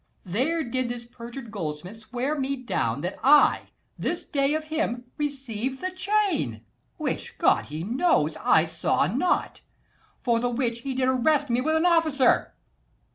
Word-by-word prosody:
There 270 - 0
did 255 -1 -2
this 240 -1 -5
perjured 235 0 -9
goldsmith 175 +1 -5
swear 245 +6 -3
me 275 -1 -1
down 145 - -2
That 180 - -4
I 290 +2 +5 0.3
this - - -2
day 280 +1 +1
of 310 - -2
him 310 -6 -2 0.2
received 265 -3 -3
the 370 0 -3
chain, 370 - 0 0.3
Which, - - -3
God - - +3
he 155 +2 -5
knows, 225 - +2
I 160 - +4
saw 160 -3 0
not: 255 - 0 0.6
for 235 -2 +1
the 245 +1 0
which 235 -1 -1
He 265 +2 -4
did 255 0 +1
arrest 275 +2 +2
me 240 +1 +2
with 315 +4 +1
an 320 +2 +2
officer. 320 -7 +3
255 Hz, 155 wpm, -26 LUFS, 225-295 Hz, 0.6 s, I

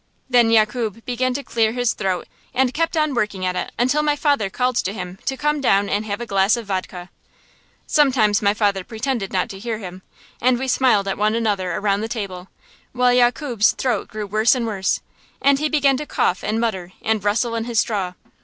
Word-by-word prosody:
Then 240 -2 +5
Yakub 225 0 +1
began 250 +1 -1
to 280 - -3
clear 225 -3 +1
his 245 -1 0
throat 190 -3 -2 0.3
and 255 -1 +2
kept 330 +1 -1
on 305 -2 +1
working 210 -6 -1
at 180 0 -1
it - - -3
until 255 +5 +2
my 300 -1 +1
father 285 -9 +1
called 250 +3 0
to 195 - -1
him 180 -2 -7
to 265 0 -1
come 300 0 0
down 200 -5 +2
and 210 +2 -1
have 200 +1 -3
a 240 - -4
glass 195 +1 +2
of 235 - -6
vodka. 185 -2 -5 0.7
Sometimes 250 -9 +3
my 200 0 +2
father 200 -3 +1
pretended 225 -1 -3
not 185 -1 0
to 195 - -8
hear 225 +1 -3
him, 185 -3 -9 0.4
and 250 0 +3
we 265 +2 -3
smiled 250 -6 +3
at 195 - -2
one 215 +1 +2
another 205 -5 0
around 200 0 0
the 220 - -2
table, 195 -6 -5 0.5
while 250 0 +3
Yakub's 245 -2 +3
throat 255 -3 -1
grew 215 -1 -5
worse 215 +6 +3
and 245 -2 -2
worse, 195 -4 -1 0.4
and 275 0 +3
he 305 +1 0
began 280 -3 +3
to 300 +2 -6
cough 180 - 0
and 215 +2 -1
mutter 190 -6 -2
and 220 -2 0
rustle 225 +3 +1
in 230 0 -2
his 235 -2 0
straw. 195 -5 -1
225 Hz, 210 wpm, -21 LUFS, 200-255 Hz, 0.7 s, Then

